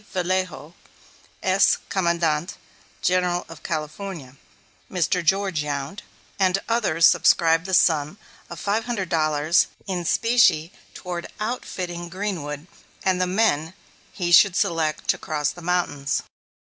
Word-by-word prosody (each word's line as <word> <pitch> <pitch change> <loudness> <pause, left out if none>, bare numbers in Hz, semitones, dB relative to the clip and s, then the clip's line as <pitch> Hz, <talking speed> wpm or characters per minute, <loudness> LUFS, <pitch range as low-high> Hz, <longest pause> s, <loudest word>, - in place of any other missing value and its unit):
Vallejo, 180 -3 -2 0.7
Ex 190 +1 +4
Commandante 170 -2 0 0.5
General 180 -1 +1
of 165 -1 -12
California; 155 -2 -5 0.6
Mr. 180 0 0
George 190 -2 +1
Yount, 145 +5 -4 0.4
and 190 -1 +3
others 210 -9 +2
subscribed 165 +1 +4
the 190 - -4
sum 155 +1 +2 0.3
of - - -8
five 215 +3 -1
hundred 205 -7 -3
dollars 155 0 +2 0.2
in 180 -2 -3
specie 185 -4 +3 0.2
toward 175 -2 -5
outfitting 180 -6 -4
Greenwood 170 -6 -4 0.4
and 185 -1 +1
the 185 - +1
men 180 -4 +1 0.4
he 175 -3 -3
should 180 +1 +7
select 155 -2 0
to - - +2
cross 150 -2 -1
the 175 - -12
mountains. 165 -5 -1
175 Hz, 120 wpm, -23 LUFS, 155-190 Hz, 0.7 s, should